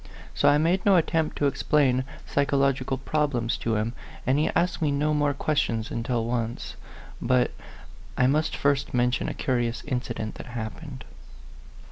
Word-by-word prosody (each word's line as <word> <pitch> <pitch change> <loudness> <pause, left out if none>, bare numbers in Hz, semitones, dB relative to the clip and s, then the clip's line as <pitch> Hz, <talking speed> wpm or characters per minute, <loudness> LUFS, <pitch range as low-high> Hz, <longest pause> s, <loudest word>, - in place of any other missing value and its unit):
So - - +4
I 145 - +5
made 170 +5 +2
no 200 -2 +5
attempt 160 -2 +1
to 145 - +1
explain 135 -2 +2 0.2
psychological 135 -2 +1
problems 135 -5 0
to 115 -1 -1
him, 110 +2 -1 0.3
and 130 +3 +2
he 155 - +2
asked 175 0 +1
me 155 - +2
no 150 +2 +1
more 145 -1 +1
questions 120 -7 0
until 115 0 -1
once 120 0 -3 0.5
But 125 0 +2 0.7
I 125 - +4
must 150 +4 +2
first 140 -2 +1
mention 125 +1 +1
a - - -5
curious 120 -2 -1
incident 120 -5 -3
that - - -12
happened. 130 +5 -7
135 Hz, 150 wpm, -26 LUFS, 120-150 Hz, 0.7 s, I